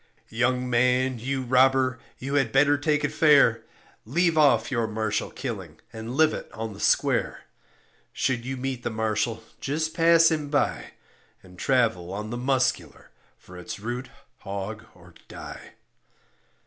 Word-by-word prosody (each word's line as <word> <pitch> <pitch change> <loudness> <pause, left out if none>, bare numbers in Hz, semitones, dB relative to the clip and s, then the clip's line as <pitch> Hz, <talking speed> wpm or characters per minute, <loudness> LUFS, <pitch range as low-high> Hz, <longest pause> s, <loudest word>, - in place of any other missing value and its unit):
Young 125 +2 0
man, 125 +1 +2
you 135 +3 -2
robber, 130 0 +3 0.2
you 135 +2 -5
had 135 -5 +2
better 145 +3 +4
take 150 +1 0
it - - -1
fair, 140 -8 +5 0.4
Leave 165 +7 +1
off 140 -6 +3
your 115 -3 0
marshal 110 -1 -2
killing - - -7
and 115 +3 -6
live 155 +1 +1
on 110 -1 -5
the 100 - -12
square; - - +1 0.7
Should 125 -3 -1
you 130 +2 -4
meet 130 -1 -4
the - - -3
marshal, 110 +1 -2 0.2
just 155 +3 -2
pass 165 -1 +5
him 150 -2 -2
by; 145 0 -1 0.5
And 90 -1 -16
travel 110 -6 +1
on 105 +2 -5
the 120 - -3
muscular, 130 0 -1 0.3
for 90 0 -13
it's 90 - -7
root 120 +4 -5 0.3
hog 100 +3 -6
or - - -18
die. - - -10
125 Hz, 145 wpm, -25 LUFS, 110-140 Hz, 0.7 s, fair